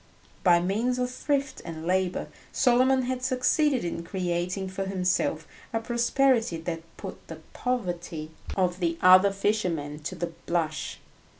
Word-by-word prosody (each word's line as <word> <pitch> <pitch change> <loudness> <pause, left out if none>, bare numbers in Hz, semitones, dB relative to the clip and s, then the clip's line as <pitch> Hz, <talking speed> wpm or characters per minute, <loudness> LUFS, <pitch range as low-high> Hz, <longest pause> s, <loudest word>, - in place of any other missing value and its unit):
By 175 -2 +6
means 220 +8 0
of 250 0 -1
thrift 275 0 -1
and 160 -1 -7
labour 185 0 +1 0.3
Solomon 255 +1 +4
had 255 0 -2
succeeded 255 - +2
in 170 -1 -3
creating 180 +1 -2
for 195 +1 -3
himself 180 -4 0 0.2
a 225 - 0
prosperity 235 -3 +2
that 165 0 -4 0.2
put - - -8
the - - -7 0.2
poverty 175 -10 -3 0.3
of 180 -1 +1
the 170 -2 0
other 185 +2 +8
fishermen 180 -8 -1
to 150 - -5
the 170 0 -3 0.2
blush. 160 -3 -1
185 Hz, 135 wpm, -27 LUFS, 170-250 Hz, 0.3 s, other